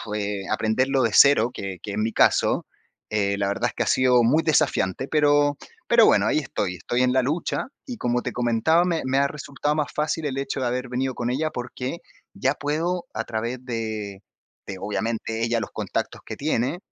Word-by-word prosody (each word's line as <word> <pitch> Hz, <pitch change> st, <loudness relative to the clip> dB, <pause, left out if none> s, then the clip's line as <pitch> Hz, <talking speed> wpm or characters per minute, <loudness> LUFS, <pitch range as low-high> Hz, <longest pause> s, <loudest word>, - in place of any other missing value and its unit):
eh, 100 Hz, -1 st, -2 dB
aprenderlo 130 Hz, +5 st, +1 dB
de 115 Hz, -, +1 dB
cero, 125 Hz, -3 st, +6 dB
que 95 Hz, -2 st, -6 dB
que 105 Hz, -, -5 dB
es 100 Hz, -, -4 dB
mi 110 Hz, +1 st, 0 dB
caso, -, -, +3 dB, 0.4 s
eh, 100 Hz, -2 st, 0 dB
la 100 Hz, -1 st, 0 dB
verdad 100 Hz, -, 0 dB
es -, -, -11 dB
que -, -, -1 dB
ha -, -, -5 dB
sido 125 Hz, -2 st, +4 dB
muy 140 Hz, +8 st, +4 dB
desafiante, 135 Hz, -, +1 dB
pero 145 Hz, -1 st, +3 dB, 0.3 s
pero -, -, +6 dB
bueno, -, -, +4 dB
ahí -, -, +2 dB
estoy, 90 Hz, -, -3 dB
estoy 120 Hz, +7 st, -1 dB
en 125 Hz, 0 st, +3 dB
la 130 Hz, 0 st, +3 dB
lucha. 155 Hz, -, -2 dB, 0.2 s
Y 250 Hz, -3 st, -6 dB
como 120 Hz, -, 0 dB
te -, -, -4 dB
comentaba, 125 Hz, +9 st, +2 dB
me 170 Hz, -3 st, 0 dB
me 130 Hz, +1 st, +1 dB
ha 140 Hz, 0 st, +3 dB
resultado 145 Hz, 0 st, -3 dB
más 150 Hz, -2 st, -1 dB
fácil 155 Hz, +1 st, -1 dB
el 135 Hz, -2 st, -2 dB
hecho 135 Hz, 0 st, -3 dB
de 125 Hz, -, 0 dB
haber 125 Hz, +1 st, -2 dB
venido 130 Hz, +1 st, -2 dB
con 120 Hz, 0 st, -2 dB
ella, 155 Hz, +5 st, 0 dB
porque 125 Hz, +4 st, -5 dB, 0.4 s
ya 135 Hz, +1 st, +1 dB
puedo 170 Hz, +5 st, -2 dB
a -, -, -2 dB
través 120 Hz, +3 st, -4 dB
de 110 Hz, -5 st, -4 dB, 0.5 s
de, 95 Hz, -, -5 dB
obviamente, 110 Hz, +3 st, -3 dB
ella, 115 Hz, 0 st, +1 dB
los -, -, -5 dB
contactos -, -, -3 dB
que -, -, -7 dB
tiene, 140 Hz, +1 st, 0 dB
125 Hz, 200 wpm, -24 LUFS, 110-145 Hz, 0.5 s, cero